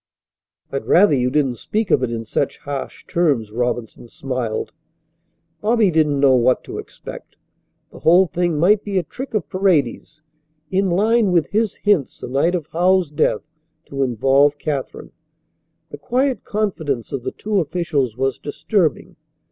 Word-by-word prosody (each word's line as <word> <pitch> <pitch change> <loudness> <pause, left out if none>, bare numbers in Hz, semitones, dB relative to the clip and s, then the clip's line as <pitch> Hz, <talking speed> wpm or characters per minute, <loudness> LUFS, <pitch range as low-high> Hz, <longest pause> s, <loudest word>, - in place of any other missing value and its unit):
"I'd 135 - -4
rather 185 -1 +5
you 125 -2 +2
didn't 135 -3 0
speak 215 - -2
of 135 - +4
it 125 -2 -1
in 115 -1 -4
such - - -1
harsh 140 -1 -6
terms," 140 -11 0
Robinson 120 0 -3
smiled. 125 -3 -4 0.9
Bobby 215 -2 +3
didn't 150 -3 +2
know 135 -1 +5
what 125 +1 +2
to - - -7
expect. - - -10 0.6
The - - -12
whole 175 +4 +5
thing 175 -2 -1
might 200 +6 +3
be 200 -2 -2
a 185 - +1
trick 255 - -7
of 180 -9 -1
Paredes, 155 -4 0 0.5
in 190 0 +1
line 210 +3 +2
with 170 -4 +1
his 215 0 0
hints 200 -10 0
the - - -6
night 140 +8 +1
of 170 -5 -3
Howells's 180 -1 +2
death, 145 - +1 0.5
to 135 -1 -3
involve 135 +4 +3
Katharine. 145 -3 -4 0.8
The - - -8
quiet 260 +1 0
confidence 160 - -2
of 135 - -3
the 125 - -4
two 210 -1 -1
officials 150 - -1
was 135 0 -1
disturbing. 155 +3 -1
155 Hz, 155 wpm, -20 LUFS, 135-190 Hz, 0.9 s, rather